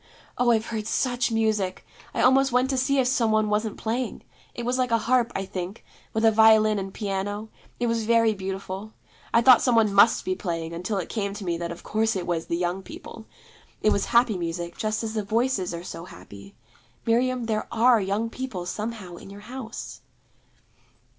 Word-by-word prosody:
Oh, 245 -1 +2
I've 225 -1 +3
heard 220 -2 -4
such 245 0 0
music! 215 -4 0 0.3
I - - -1
almost 265 +2 +5
went 250 +2 +2
to 265 - 0
see 275 +2 +1
if 260 - +3
some 245 -3 +2
one 215 -1 +2
wasn't 215 0 -1
playing. 240 +3 -3 0.3
It 240 - -5
was 250 +1 0
like 250 -1 +1
a 230 - +3
harp, 235 +1 +1
I 195 - -2
think, 185 +2 -6 0.3
with 220 +1 0
a 225 - +7
violin 215 -1 +5
and 195 0 -5
piano: 205 +1 -3 0.3
it 240 - 0
was 230 -1 0
very 230 -1 +4
beautiful. 195 +1 -6 0.4
I 230 - +4
thought 255 -1 +8
some 250 -2 +2
one 215 -3 +3
must 200 +3 +5
be 185 - 0
playing, 170 -3 -4
until 180 +5 -3
it 185 - -3
came 200 -3 -3
to 205 -2 -7
me 170 -1 0
that 170 0 -3
of 170 - -9
course 220 0 0
it 180 -2 -2
was 165 -2 -2
the 170 - -1
Young 180 +2 -1
People. 220 +3 -11 0.6
It 215 - +4
was 200 - +1
happy 235 -5 +3
music, 170 0 -4
just 215 +1 -2
as 220 -1 -3
the 220 - -1
Voices 220 -2 0
are 170 0 -6
so 170 -1 -7
happy. 100 - -13 0.5
Miriam, 245 +1 +1
there 215 -1 -1
are 230 0 +4
young 200 +4 -1
people 240 -10 -5
somehow 210 -2 -5
in - - -12
your 200 +1 -11
house.' 240 +1 -8
215 Hz, 200 wpm, -25 LUFS, 190-235 Hz, 0.6 s, thought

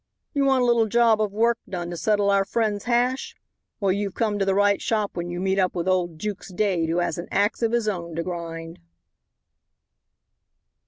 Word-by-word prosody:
"You 280 -2 +1
want 265 -2 +3
a - - +3
little 235 -2 +3
job 230 -1 +3
of 210 -2 0
work 230 +3 +2
done 175 -2 -4
to - - -4
settle 205 +2 +2
our 195 0 +3
friend's 210 0 -1
hash. 245 +2 0 0.4
Well, 200 -3 +2
you've 200 0 -2
come 210 -3 0
to 195 - +1
the 195 0 +1
right 205 0 +3
shop 215 -3 0
when 175 0 -4
you 175 0 -4
meet 190 +1 0
up 185 -1 +1
with 175 0 -2
old 180 -3 0
Jukes 205 +1 -5
Dade 180 -4 0
who 165 - 0
has 175 -2 -1
an 170 - -6
axe 205 +4 +1
of 230 -1 +1
his 235 -2 0
own 170 -5 -3
to 165 - -2
grind." 165 -2 -6
200 Hz, 205 wpm, -24 LUFS, 175-220 Hz, 0.4 s, want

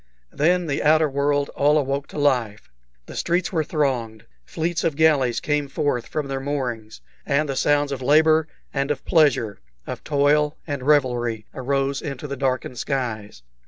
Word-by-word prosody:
Then 175 +4 +2
the 145 -3 -2
outer 155 +1 +4
world 140 0 0
all 150 +2 +2
awoke 140 -1 -1
to - - -10
life; 125 - 0 0.3
the - - -10
streets 175 +1 0
were 160 -2 +1
thronged, 125 -8 -2 0.2
fleets 170 - -2
of 160 -3 0
galleys 140 -6 +3
came 145 -1 -1
forth 140 -3 -1
from 150 -2 -3
their 135 -1 -3
moorings, 125 - -4 0.2
and 150 +2 +1
the 135 - -3
sounds 145 +1 +2
of 135 -2 -4
labor 155 +3 +4 0.3
and 140 0 -1
of 150 - -3
pleasure, 140 - +2 0.3
of - - -6
toil 150 +1 +2
and 145 -4 -4
revelry, 120 -6 +1
arose 135 +1 -1
into 140 0 -5
the 140 - -4
darkened 130 -2 -2
skies. 110 - -3
140 Hz, 160 wpm, -23 LUFS, 130-150 Hz, 0.3 s, outer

